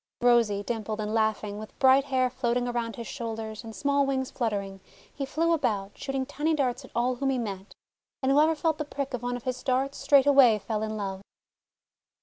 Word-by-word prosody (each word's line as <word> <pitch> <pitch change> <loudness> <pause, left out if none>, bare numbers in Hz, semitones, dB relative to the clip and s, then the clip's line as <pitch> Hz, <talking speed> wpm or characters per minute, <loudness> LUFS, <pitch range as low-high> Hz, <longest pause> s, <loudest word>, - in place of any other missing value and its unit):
Rosy, 230 -4 +3
dimpled, 220 -1 -3
and 215 0 -2
laughing, 215 -2 0
with 215 - -10
bright 265 +1 +5
hair 255 -2 +1
floating 245 -1 0
around 235 -2 -2
his 235 - -7
shoulders, 225 -3 -5
and 225 -1 -9
small 280 0 +2
wings 265 -1 -1
fluttering, 200 -5 -3 0.3
he 275 -2 -4
flew 330 +4 +1
about, 210 -10 -1
shooting 270 -1 -3
tiny 310 +4 -1
darts 260 -2 -1
at 260 - -12
all 245 +1 +1
whom 275 +2 0
he 265 - +1
met. 200 -4 -5 0.5
And 265 - +3
whoever 305 +3 +4
felt 315 0 0
the - - 0
prick 280 -2 -4
of 245 - -3
one 245 0 -2
of 245 - -12
his 255 -1 -3
darts 265 +2 0
straightway 275 -5 +6
fell 215 +1 -3
in 215 0 -3
love. 195 -2 -4
245 Hz, 195 wpm, -27 LUFS, 220-275 Hz, 0.5 s, straightway